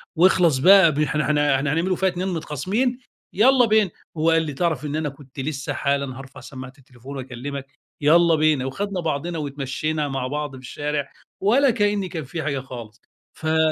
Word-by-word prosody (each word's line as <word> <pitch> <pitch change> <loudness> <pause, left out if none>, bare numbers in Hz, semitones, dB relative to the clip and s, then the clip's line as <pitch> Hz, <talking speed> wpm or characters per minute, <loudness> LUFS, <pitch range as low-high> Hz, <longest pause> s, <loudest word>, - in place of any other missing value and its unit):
واخلص 170 -4 +4
بقى 190 +3 +7
ب 145 - -3
إحنا 150 0 +1
إحنا 145 -2 +2
إحنا 140 +2 0
هنعملوا 180 +3 +1
فيها 190 +1 +1
اتنين 180 +1 -3
متخاصمين، 190 - -1 0.3
يالّا 250 +4 +5
بينا." 215 -3 +3 0.3
وهو 160 +1 +2
قال 165 0 +4
لي: 150 -3 -4
"تعرف 160 0 -1
إن 145 +1 -3
أنا 155 -1 -1
كنت 140 -1 -13
لسه 140 0 -3
حالًا 140 -2 -1
هارفع 135 0 -11
سَمَّاعة 130 -1 -9
التليفون 130 +1 -11
وأكلِّمك، 135 +2 -6 0.3
يالّا 165 +2 +5
بينا." 155 -4 +2
وخدنا 195 +8 -3
بعضنا 165 +1 -2
واتمَشَّينا 145 +1 -2
مع 135 -2 -3
بعض 150 +1 -3
في 130 -1 -11
الشارع، 145 +2 -4 0.3
ولا 250 +8 +4
كأنِّي 205 -4 0
كان 160 -3 -5
في 155 +5 -5
حاجة 140 -2 -1
خالص. 120 -3 -10 0.3
في 160 0 -1
150 Hz, 180 wpm, -23 LUFS, 135-175 Hz, 0.3 s, بقى